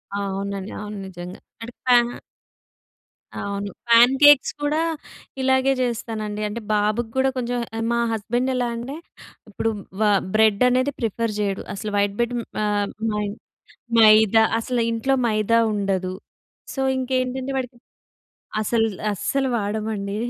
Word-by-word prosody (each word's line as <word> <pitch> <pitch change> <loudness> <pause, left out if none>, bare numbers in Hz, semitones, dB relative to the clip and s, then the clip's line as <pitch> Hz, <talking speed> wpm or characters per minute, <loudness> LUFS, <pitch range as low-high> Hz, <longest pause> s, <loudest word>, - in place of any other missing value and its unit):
అవునండి. 200 0 -3
అవును. 210 0 -6
నిజంగా 180 -1 -9 0.2
అంటే 235 +2 -8
ప్యా 250 -1 +6 1.4
అవును. 200 0 -4 0.2
ప్యాన్ 235 +2 +7
కేక్స్ 290 -3 +7
కూడా 295 +2 +1 0.6
ఇలాగే 265 0 +3
చేస్తానండి. 220 -3 -3
అంటే 220 +3 -5
బాబుకి 215 +2 0
కూడా 265 0 +3
కొంచెం 245 0 -2 0.2
ఆహ్, 225 - -2
మా 235 - +1
హస్బెండ్ 240 +4 -1
ఎలా 245 -1 0
అంటే, 240 +5 -6 0.5
ఇప్పుడు 220 +2 -1 0.3
వ - - -2 0.3
బ్రెడ్ 215 -2 +3
అనేది 255 +3 +1
ప్రిఫర్ 230 -1 -1
చేయడు. 200 -2 -1
అసలు 210 +1 -5
వైట్ 200 0 +1
‌బ్రెడ్ 240 +1 0 0.3
ఆహ్, 205 -1 0 0.3
మై‌న్ 210 -1 -2 0.7
మైదా 220 0 +7 0.2
అసలు 240 +1 -1
ఇంట్లో 230 +4 0
మైదా 215 +1 +2
ఉండదు. 195 -3 -1 0.6
సో 270 - -3 0.2
ఇంకేంటంటే 260 +1 -1
వాడికి 250 -1 -5 0.8
అసలు‌ 225 +1 +1 0.3
అస్సలు 265 +7 -1
వాడమండి. 205 -1 -3
225 Hz, 125 wpm, -22 LUFS, 205-245 Hz, 1.4 s, ప్యాన్